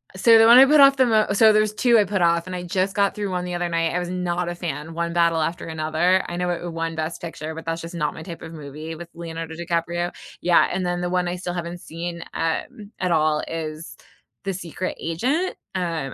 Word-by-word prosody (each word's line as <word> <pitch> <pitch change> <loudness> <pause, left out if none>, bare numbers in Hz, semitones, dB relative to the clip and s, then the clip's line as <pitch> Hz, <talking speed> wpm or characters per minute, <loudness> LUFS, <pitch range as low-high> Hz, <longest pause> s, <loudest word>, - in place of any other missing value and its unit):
Uh, - - -8
so, 225 +4 +6
the 225 - +7
one 235 +1 +9
I 265 - +10
put 300 +2 +5
off 275 0 +7
the 260 - +5
mo 220 -3 +3
so 220 +2 +6
there's 215 0 +2
2 240 +1 +4
I 210 - +5
put 195 -1 -1
off, 170 0 +2
and 185 - -5
I 180 - -5
just 185 +2 -1
got 200 -1 +2
through 205 -2 -3
one 180 -1 -2
the 180 - -4
other 175 0 -1
night, 165 -1 0
I 180 - 0
was 175 -1 -4
not 180 -1 -2
a 175 - -4
fan: 160 -2 -5
One 170 0 -2
Battle 170 -1 +2
After 165 +3 -2
Another. 160 +3 +1
I 175 - -4
know 180 0 -1
i 175 - +1
it 175 - -4
won 165 0 -3
Best 160 +1 -4
Picture, 160 -2 -6
but 165 - -8
that's 165 0 -3
just 170 +1 -8
not 150 -3 -1
my 160 - -9
type 170 0 -8
of 165 0 -9
movie, 155 +1 -8
with 170 +1 -10
Leonardo 165 -1 -6
DiCaprio. 170 +1 -2 0.3
Yeah, 175 -1 +4
and 185 0 -2
then 175 0 -1
the 175 - -1
one 180 0 0
I 175 - -2
still 180 -1 -5
haven't 175 0 -5
seen, 170 +1 -6
um, 200 +5 -3
at 180 -1 0
all 155 -2 +2
is 160 0 -6 0.5
The 195 - -1
Secret 180 0 -5
Agent. 260 - -1 0.2
Um, 165 -7 -2
175 Hz, 255 wpm, -23 LUFS, 165-185 Hz, 0.5 s, I